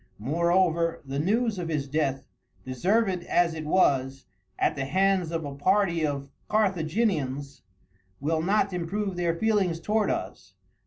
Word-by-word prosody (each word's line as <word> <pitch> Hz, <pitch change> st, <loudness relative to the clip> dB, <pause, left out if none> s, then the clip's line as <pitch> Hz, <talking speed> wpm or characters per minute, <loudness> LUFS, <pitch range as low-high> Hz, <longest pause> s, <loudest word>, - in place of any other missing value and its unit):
Moreover, 170 Hz, -, +1 dB
the 135 Hz, +1 st, -3 dB
news 215 Hz, +5 st, +1 dB
of 170 Hz, -2 st, -4 dB
his 150 Hz, -3 st, -2 dB
death, 135 Hz, -2 st, -1 dB, 0.4 s
deserved 185 Hz, -, +1 dB
as 175 Hz, -2 st, +2 dB
it 160 Hz, -1 st, -6 dB
was, 135 Hz, -6 st, +2 dB, 0.3 s
at -, -, +1 dB
the 135 Hz, -2 st, -2 dB
hands 190 Hz, +2 st, +2 dB
of 165 Hz, -2 st, -3 dB
a 140 Hz, -, -5 dB
party 170 Hz, +2 st, +1 dB
of 140 Hz, -2 st, -2 dB, 0.2 s
Carthaginians, 160 Hz, -, 0 dB, 0.6 s
will 160 Hz, +3 st, 0 dB
not 195 Hz, +2 st, +1 dB
improve 190 Hz, +3 st, -2 dB
their 170 Hz, -1 st, 0 dB
feelings 195 Hz, -4 st, +1 dB
towards 210 Hz, +5 st, +1 dB
us. -, -, -6 dB
170 Hz, 140 wpm, -27 LUFS, 145-195 Hz, 0.6 s, as